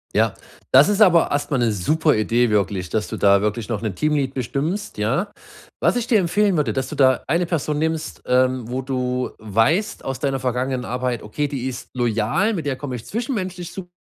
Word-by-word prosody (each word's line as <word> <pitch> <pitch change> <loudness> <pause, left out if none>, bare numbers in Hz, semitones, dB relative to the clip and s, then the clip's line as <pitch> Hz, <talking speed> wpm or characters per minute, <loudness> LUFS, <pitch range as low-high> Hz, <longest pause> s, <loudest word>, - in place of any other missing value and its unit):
Ja, - - +3 0.4
das 135 +7 +7
ist 210 +1 +1
aber 175 -5 +5
erst 145 +1 -1
mal 135 - +2
'ne 120 -2 +2
super 155 - +2
Idee 115 +2 +2
wirklich, 100 -3 0
dass 110 -1 -2
du - - -4
da 100 -1 +4
wirklich 105 +1 -2
noch 110 -4 -3
'ne 110 -4 -2
Team 150 +11 0
Lead 135 -2 -1
bestimmst, 150 - -3
ja? 135 - 0 0.5
Was - - +3
ich 240 -1 -2
dir 225 -3 +4
empfehlen 195 +2 +2
würde, 145 -8 +1
dass 130 +4 -2
du - - -6
da 130 -2 +3
eine 170 +5 +1
Person 155 -3 -1
nimmst, 160 +1 -2
ähm, 125 -1 +1
wo 130 +1 -2
du 125 -1 -2
weißt 115 - 0
aus 135 -1 -3
deiner 135 -1 -1
vergangenen 125 0 -2
Arbeit: 125 -1 -2
„Okay, 145 +8 -2
die 135 -4 -4
ist 130 -1 -6
loyal, 120 - +1
mit 170 -7 -4
der 135 -3 -1
komme 130 -3 -5
ich 120 - -8
zwischenmenschlich 190 -7 -4
su 185 -2 -7
130 Hz, 210 wpm, -21 LUFS, 120-165 Hz, 0.5 s, das